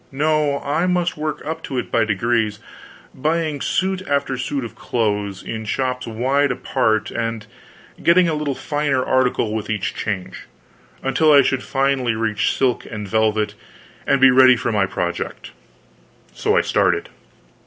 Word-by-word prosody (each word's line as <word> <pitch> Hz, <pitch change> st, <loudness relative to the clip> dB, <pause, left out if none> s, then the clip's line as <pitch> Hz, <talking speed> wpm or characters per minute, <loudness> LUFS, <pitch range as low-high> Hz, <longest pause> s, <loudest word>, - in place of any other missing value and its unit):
No, 150 Hz, 0 st, +1 dB
I 155 Hz, +6 st, 0 dB
must 180 Hz, -1 st, 0 dB
work 155 Hz, 0 st, -4 dB
up 160 Hz, +2 st, -4 dB
to 135 Hz, -, -5 dB
it 125 Hz, -, -3 dB
by 115 Hz, -2 st, +2 dB
degrees, 110 Hz, 0 st, 0 dB, 0.6 s
buying 155 Hz, 0 st, -1 dB
suit 190 Hz, 0 st, 0 dB
after 140 Hz, -2 st, 0 dB
suit 130 Hz, +1 st, -3 dB
of 115 Hz, -, -8 dB
clothes, 105 Hz, -4 st, -2 dB
in 110 Hz, -1 st, -5 dB
shops 125 Hz, +2 st, -2 dB
wide 130 Hz, +5 st, +1 dB
apart, 110 Hz, -3 st, 0 dB
and 115 Hz, -2 st, -3 dB, 0.6 s
getting 175 Hz, +1 st, +5 dB
a 165 Hz, -, 0 dB
little 150 Hz, -3 st, -2 dB
finer 145 Hz, -3 st, -1 dB
article 125 Hz, -4 st, +1 dB
with 110 Hz, 0 st, -4 dB
each 105 Hz, -3 st, -2 dB
change, 100 Hz, -4 st, -5 dB, 0.6 s
until 155 Hz, +4 st, +3 dB
I 140 Hz, -1 st, +7 dB
should 130 Hz, 0 st, 0 dB
finally 135 Hz, -4 st, 0 dB
reach 110 Hz, -1 st, 0 dB
silk 130 Hz, -3 st, +1 dB
and 105 Hz, -2 st, -6 dB
velvet, 110 Hz, 0 st, +1 dB, 0.5 s
and 140 Hz, -, +3 dB
be 130 Hz, 0 st, +7 dB
ready 130 Hz, 0 st, +7 dB
for 120 Hz, 0 st, -2 dB
my 100 Hz, -3 st, +1 dB
project. 90 Hz, -2 st, -4 dB, 0.8 s
So -, -, +1 dB
I -, -, +5 dB
started. -, -, +1 dB
130 Hz, 155 wpm, -20 LUFS, 110-145 Hz, 0.8 s, I